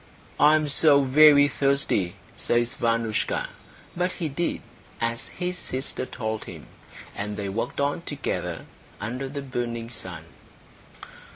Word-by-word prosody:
"I 150 +1 +7
am 155 -1 +1
so 145 0 +5
very 145 +1 +7
thirsty," 135 -10 +1 0.2
says 120 0 0
Vanoushka; 115 -2 0 0.5
but 180 +1 0
he 165 -4 -3
did 165 +5 -2 0.4
as 115 0 -2
his 180 0 -4
sister 130 -1 -4
told 110 -2 -4
him, - - -9 0.5
and 105 0 -4
they 100 -1 -3
walked 115 +8 -3
on 145 +3 0
together 145 -4 -4 0.3
under 125 +6 -4
the 140 0 -5
burning 120 -3 -4
sun. 90 -8 -7
130 Hz, 125 wpm, -26 LUFS, 115-145 Hz, 0.5 s, I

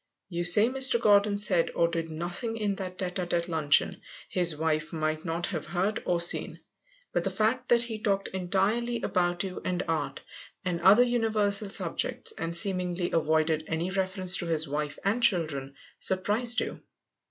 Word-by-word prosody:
You 175 -1 -2
say 205 +5 +8
Mr. 260 -1 +2
Gordon 205 -2 +4
said 185 -5 +3
or 170 - +3
did 165 -1 -3
nothing 175 +8 -4
in 210 -2 -1
that 185 -2 -6
tête 185 -1 -2
à - - -6
tête 170 -1 -1
luncheon 155 -4 +1 0.3
his 175 -4 +1
wife 155 -1 -1
might 155 -1 -2
not 170 +1 -2
have 160 - -4
heard 195 +4 -1
or 175 -1 +1
seen, 170 - +1 0.5
but - - 0
the - - 0
fact 245 +4 0
that 235 -1 +4
he 225 -2 -5
talked 195 -2 0
entirely 200 +6 -1
about 175 -1 0
you 190 -2 -6
and 180 -1 -1
art, 160 -3 -2 0.4
and 175 -2 -2
other 210 +6 +7
universal 215 -4 +1
subjects, 455 - -2
and 170 +1 -3
seemingly 180 -1 -1
avoided 155 -1 +1
any 165 +3 -2
reference 190 -1 0
to 175 - -4
his 160 -1 0
wife 145 0 -3
and 215 +5 +1
children, 155 - 0 0.2
surprised 220 +5 0
you. - - -5
180 Hz, 170 wpm, -28 LUFS, 165-210 Hz, 0.5 s, say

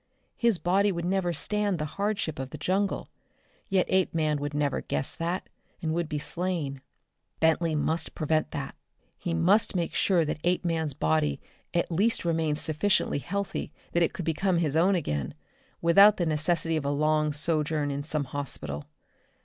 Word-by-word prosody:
His 235 -5 +2
body 195 +4 +2
would 170 -2 -3
never 185 -1 +1
stand 205 +4 0
the 150 - -2
hardship 200 -2 -2
of 130 -1 -4
the 150 - -7
jungle, 190 +6 -1 0.6
yet 190 -2 +3
Apeman 160 -5 +1
would 145 +1 -4
never 145 -1 0
guess 135 - -3
that, 170 +3 -2 0.3
and 160 -1 -2
would 170 -1 -1
be 150 - -2
slain. 155 -4 -3 0.6
Bentley 160 0 +2
must 160 +2 -1
prevent 155 0 0
that. - - -5 0.5
He 170 -2 -2
must 190 +6 +3
make 170 -2 -1
sure 175 -4 +3
that 155 0 -3
Apeman's 165 -4 0
body 80 - +1 0.3
at 170 0 0
least 200 +4 +1
remained 160 -3 +1
sufficiently 155 +1 +1
healthy 200 +5 -3 0.2
that 170 - +1
it 170 - +3
could 180 - -6
become 175 +3 +1
his 155 -4 0
own 185 +5 +4
again 75 - -2 0.5
without 200 +5 +7
the 175 - 0
necessity 160 +1 +1
of 155 - -2
a - - +1
long 150 +1 +2
sojourn 150 0 0
in 140 +1 -3
some 150 -1 -1
hospital. 120 - -3
165 Hz, 165 wpm, -28 LUFS, 150-180 Hz, 0.6 s, without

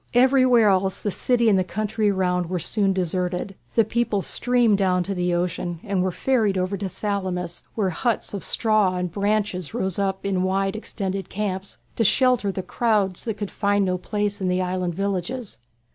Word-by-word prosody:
Everywhere 255 -3 +5
else 190 0 +2
the 205 - -2
city 235 +3 +1
and 200 -3 +5
the - - +2
country 215 +2 -1
round 180 -2 0
were 185 - -1
soon 195 +3 0
deserted. 180 +1 -2 0.2
The 225 - +5
people 220 -3 0
streamed 240 -4 +2
down 180 -2 +2
to 195 - -3
the 180 -1 -1
shore 175 0 -1
and 195 -2 0
were 185 - +1
ferried 220 -2 +1
over 185 +2 -1
to 195 0 -4
Salamis, 185 -3 -3
where 195 -4 0
huts 230 +6 -1
of 200 - -4
straw 215 -5 +2
and 180 -1 -2
branches 200 -2 -1
rose 190 -5 -2
up 195 -1 -1
in 190 -2 0
wide 195 +1 0
extended 195 -3 -4
camps 195 -2 -3 0.2
to 230 - +3
shelter 240 -1 +3
the 190 0 -4
crowds 205 -6 0
that 225 -3 -2
could 205 -2 -4
find 205 -1 +1
no 185 -1 -1
place 205 +1 -2
in 185 - 0
the 180 0 +1
island 180 -1 -1
villages. 200 +5 -3
195 Hz, 185 wpm, -23 LUFS, 185-215 Hz, 0.2 s, Everywhere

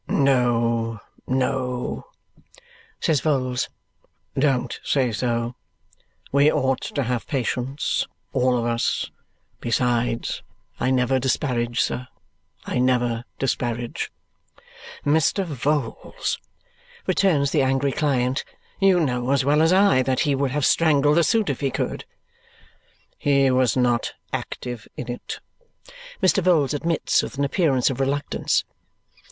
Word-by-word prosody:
"No, 120 -4 +2 0.3
no," 125 -1 -1 0.9
says 155 -4 +1
Vholes. 130 -4 0 0.6
"Don't 130 -3 0
say 130 -4 +1
so. 115 +1 -1 0.8
We 140 +2 +5
ought 130 0 +1
to 140 - -2
have 120 -1 -2
patience, 135 0 -1 0.3
all 125 -1 +2
of 115 - -1
us. 115 0 0 0.5
Besides, 120 0 0 0.4
I - - +1
never 130 0 +2
disparage, 120 -2 0
sir. 125 +1 -2 0.6
I - - -1
never 120 -2 +1
disparage." 120 -3 -2 0.9
"Mr. 160 +6 +2
Vholes," 145 - -2 0.7
returns 145 -8 +2
the - - +3
angry 135 +1 +1
client. 130 -3 0 0.4
"You 195 -2 +5
know 125 -4 -1
as 135 -1 +2
well 150 +2 +4
as 165 +1 +4
I 185 -8 +5
that 130 0 0
he 145 -3 +2
would 135 0 0
have 145 +2 0
strangled 150 -2 +4
the 170 - +5
suit 225 +3 +2
if 140 -4 -1
he 140 - 0
could." - - -3 1.1
"He 140 -2 +3
was 130 -1 +2
not 120 -2 +1 0.2
active 120 -3 -5
in 120 - -4
it," 120 - -6 0.8
Mr. 185 +1 +4
Vholes 160 -6 +3
admits 165 +2 +1
with - - -7
an 140 - +1
appearance 140 -4 +2
of 130 - -5
reluctance. 140 +2 0
130 Hz, 120 wpm, -23 LUFS, 125-145 Hz, 1.1 s, We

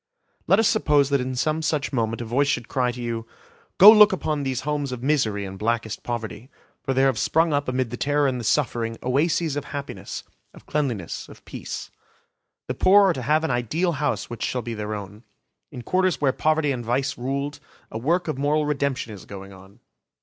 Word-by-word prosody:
Let 195 - +5
us 225 -1 +4
suppose 150 -11 +3
that 140 -2 +2
in 130 0 -3
some 155 +5 0
such 150 -2 -1
moment 115 -1 -1
a - - -7
voice 130 +5 +1
should 120 -5 -1
cry 125 -2 0
to 120 - -9
you, 115 -1 -4 0.5
"Go 205 +3 +11
look 210 -1 +8
upon 155 -5 -1
these 130 -2 -2
homes 145 -1 -2
of 125 -1 -6
misery 115 -9 +1
and 95 0 -8
blackest 115 -1 -1
poverty. 120 +1 -5 0.3
For 135 -2 -2
there 135 +1 +4
have 130 -5 +2
sprung 160 0 +2
up 145 0 0
amid 130 -2 -1
the 125 - -4
terror 145 +2 +1
and 130 -2 -1
the - - -5
suffering, 115 -3 0
oases 150 +4 +1
of 145 - -3
happiness, 140 -1 -6 0.3
of - - -15
cleanliness, 125 - -3
of - - -15
peace. - - -7 0.7
The - - -3
poor 200 +1 +5
are - - +2
to 130 - -5
have 155 +5 +2
an 160 - 0
ideal 125 - 0
house 125 -9 -1
which 120 - -8
shall 125 -2 -2
be 120 - -4
their 105 -1 -4
own. 100 +1 -8 0.5
In 125 - -8
Quarters 185 +2 +1
where 135 -3 +2
poverty 155 -1 +1
and 125 -3 -3
vice 130 +4 -1
ruled, 140 +3 -3 0.3
a 110 - -4
work 170 +9 0
of 150 -4 -3
moral 150 +2 +1
redemption 140 -6 -1
is 100 - -11
going 100 0 -10
on. 95 +5 -16
135 Hz, 210 wpm, -24 LUFS, 115-150 Hz, 0.7 s, Go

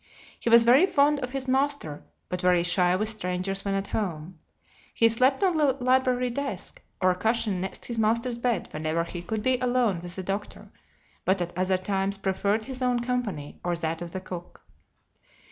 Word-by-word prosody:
He - - -1
was 230 0 +8
very 260 +10 +6
fond 290 -3 +3
of 250 -2 -3
his 265 0 -3
master, 265 - 0 0.3
but 180 0 -4
very 180 -2 +3
shy 180 0 +3
with 215 +3 -1
strangers 195 -2 -2
when 195 -1 -1
at 195 0 -2
home. 175 -4 -4 0.6
He 230 - +5
slept 255 - +2
on 365 -3 +3
the 290 -3 +3
library 255 -1 +1
desk, 240 -7 -5 0.2
or 185 0 +4
a - - -1
cushion 215 -2 0
next 190 - -5
his 235 -2 -4
master's 230 +2 +1
bed 235 -5 0
whenever 155 +2 -1
he 170 +1 -7
could 210 +4 -4
be 255 0 +2
alone 245 -7 +1
with 175 0 -4
the 190 - -5
doctor, 195 +2 -5 0.5
but 190 +1 +2
at 175 -1 -4
other 185 +1 +1
times 195 +1 -1
preferred 200 +2 0
his 260 -1 -6
own 250 -1 +1
company 235 - -3
or 175 -1 0
that 165 0 -3
of 170 -1 -6
the 190 - -5
cook. 180 -2 -9
205 Hz, 190 wpm, -26 LUFS, 180-250 Hz, 0.6 s, was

